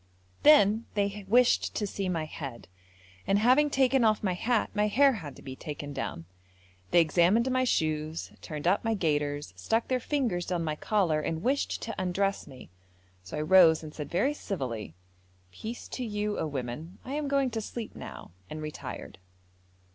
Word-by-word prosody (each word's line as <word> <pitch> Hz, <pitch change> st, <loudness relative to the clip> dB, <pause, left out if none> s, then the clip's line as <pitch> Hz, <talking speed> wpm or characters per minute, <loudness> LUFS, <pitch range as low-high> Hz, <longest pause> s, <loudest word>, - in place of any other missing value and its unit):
Then 230 Hz, -7 st, +6 dB
they 200 Hz, 0 st, -1 dB
wished 245 Hz, +4 st, +3 dB
to 210 Hz, -, 0 dB
see 195 Hz, -1 st, -3 dB
my 165 Hz, -3 st, -1 dB
head, 140 Hz, -6 st, -8 dB, 0.6 s
and 195 Hz, -, +3 dB
having 255 Hz, +7 st, +4 dB
taken 265 Hz, -2 st, +3 dB
off 215 Hz, -1 st, +3 dB
my 190 Hz, -3 st, +1 dB
hat, 225 Hz, +5 st, 0 dB
my 210 Hz, 0 st, +2 dB
hair 270 Hz, +6 st, +5 dB
had 160 Hz, -, -7 dB
to -, -, -14 dB
be 130 Hz, -1 st, -7 dB
taken 145 Hz, 0 st, -6 dB
down. 105 Hz, -10 st, -4 dB, 0.6 s
They 175 Hz, -, +5 dB
examined 180 Hz, -, +3 dB
my 255 Hz, 0 st, +2 dB
shoes, 155 Hz, -5 st, -1 dB
turned 150 Hz, -1 st, -6 dB
up 180 Hz, +4 st, +3 dB
my 225 Hz, -1 st, +1 dB
gaiters, 145 Hz, -, -1 dB
stuck 225 Hz, -, -1 dB
their 255 Hz, -1 st, +1 dB
fingers 235 Hz, -10 st, -1 dB
down 175 Hz, -2 st, -1 dB
my 155 Hz, -1 st, -2 dB
collar, 170 Hz, -4 st, +1 dB
and 160 Hz, +2 st, -3 dB
wished 275 Hz, +3 st, 0 dB
to 225 Hz, -, -4 dB
undress 195 Hz, +2 st, -1 dB
me, 130 Hz, -10 st, -13 dB, 0.5 s
so 95 Hz, +10 st, -7 dB
I -, -, -1 dB
rose 165 Hz, -1 st, +6 dB
and 155 Hz, -1 st, -8 dB
said 150 Hz, -2 st, -6 dB
very 265 Hz, +12 st, +1 dB
civilly, 125 Hz, -, -5 dB, 0.6 s
'Peace 220 Hz, -, -7 dB
to 255 Hz, -, -4 dB
you, 210 Hz, -2 st, -2 dB
oh -, -, -1 dB
women, 145 Hz, +5 st, -5 dB
I 260 Hz, -, -5 dB
am 295 Hz, 0 st, -2 dB
going 275 Hz, -2 st, +1 dB
to 225 Hz, -1 st, -2 dB
sleep 225 Hz, +1 st, -6 dB
now,' -, -, -9 dB, 0.2 s
and 155 Hz, -, -6 dB
retired. 155 Hz, 0 st, -7 dB
190 Hz, 180 wpm, -29 LUFS, 155-230 Hz, 0.6 s, Then